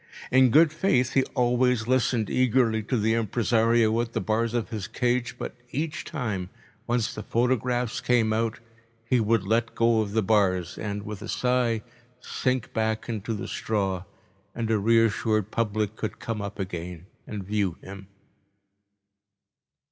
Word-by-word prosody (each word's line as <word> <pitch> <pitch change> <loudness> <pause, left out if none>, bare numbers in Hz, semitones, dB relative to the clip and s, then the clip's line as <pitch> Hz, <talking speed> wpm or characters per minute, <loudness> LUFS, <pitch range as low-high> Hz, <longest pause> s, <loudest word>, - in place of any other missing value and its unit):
In 130 0 +6
good 155 +4 +5
faith 140 -8 +1
he 135 - +4
always 125 -2 +2
listened 125 -3 +2
eagerly 120 -3 +2
to 125 - 0
the 110 +1 +2
impresario 115 0 +2
at 120 0 -5
the - - 0
bars 115 +2 0
of 120 -1 -1
his 105 -4 -4
cage, 125 +2 -1
but - - -5 0.2
each 150 +4 -3
time, 105 - -3 0.4
once 120 -2 0
the 105 - -6
photographs 120 +1 0
came 115 -3 +2
out, 115 0 -1 0.5
he 125 +2 +2
would 110 -1 +2
let 115 +3 0
go 115 -1 +3
of 100 -1 -4
the 110 -1 +2
bars 95 -4 +2
and, 105 -1 -4
with 105 -1 -7
a 110 - -6
sigh, 125 -3 +1 0.4
sink 130 -2 -2
back 110 0 -1
into 110 0 -3
the 100 - -5
straw, 95 -4 -1 0.5
and 115 -1 -2
a 110 - +3
reassured 110 -1 +2
public 110 -2 -1
could 110 - -4
come 115 -2 -4
up 100 0 -6
again 90 -3 -5 0.2
and 105 -2 -5
view 100 -3 -1
him. 100 0 -10
115 Hz, 155 wpm, -26 LUFS, 105-120 Hz, 0.5 s, In